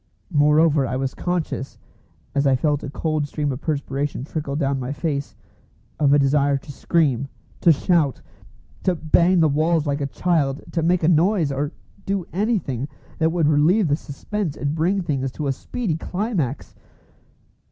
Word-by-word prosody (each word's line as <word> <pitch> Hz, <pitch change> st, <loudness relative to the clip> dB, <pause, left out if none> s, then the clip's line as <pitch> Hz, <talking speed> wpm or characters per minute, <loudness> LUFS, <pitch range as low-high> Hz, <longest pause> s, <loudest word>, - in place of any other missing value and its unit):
Moreover, 150 Hz, -1 st, +4 dB
I 120 Hz, -, -2 dB
was 130 Hz, 0 st, -2 dB
conscious, 175 Hz, -6 st, -3 dB, 0.6 s
as 140 Hz, 0 st, +2 dB
I 135 Hz, -, +4 dB
felt 145 Hz, +2 st, +1 dB
a 145 Hz, -, -5 dB
cold 155 Hz, 0 st, -1 dB
stream 145 Hz, -1 st, -2 dB
of 130 Hz, +1 st, -5 dB
perspiration 140 Hz, -3 st, -2 dB
trickle 145 Hz, -1 st, -4 dB
down 140 Hz, -2 st, 0 dB
my 125 Hz, +1 st, -4 dB
face, 145 Hz, -1 st, -3 dB, 0.6 s
of 145 Hz, -2 st, +4 dB
a 145 Hz, -, +6 dB
desire 140 Hz, 0 st, +3 dB
to 145 Hz, +2 st, -10 dB
scream, 140 Hz, -3 st, +1 dB, 0.3 s
to 170 Hz, -, +6 dB
shout, 155 Hz, -2 st, +2 dB, 0.6 s
to 185 Hz, -, +1 dB
bang 170 Hz, +3 st, +3 dB
the 160 Hz, -, +5 dB
walls 155 Hz, +2 st, +1 dB
like 145 Hz, 0 st, -1 dB
a 140 Hz, -, 0 dB
child, 145 Hz, -3 st, 0 dB
to 165 Hz, -, 0 dB
make 175 Hz, +1 st, +2 dB
a -, -, +4 dB
noise, 170 Hz, -1 st, +3 dB
or 140 Hz, +2 st, -2 dB, 0.3 s
do 195 Hz, -3 st, -2 dB
anything 175 Hz, -, -1 dB, 0.3 s
that 160 Hz, 0 st, +3 dB
would 165 Hz, -3 st, +2 dB
relieve 155 Hz, +6 st, +3 dB
the 145 Hz, -, +3 dB
suspense 160 Hz, +4 st, -4 dB
and 140 Hz, +3 st, -1 dB
bring 175 Hz, +5 st, +1 dB
things 135 Hz, -5 st, -1 dB
to 150 Hz, -, -4 dB
a 140 Hz, -, +1 dB
speedy 170 Hz, -, -3 dB
climax. 180 Hz, -, -3 dB
150 Hz, 165 wpm, -22 LUFS, 140-170 Hz, 0.6 s, a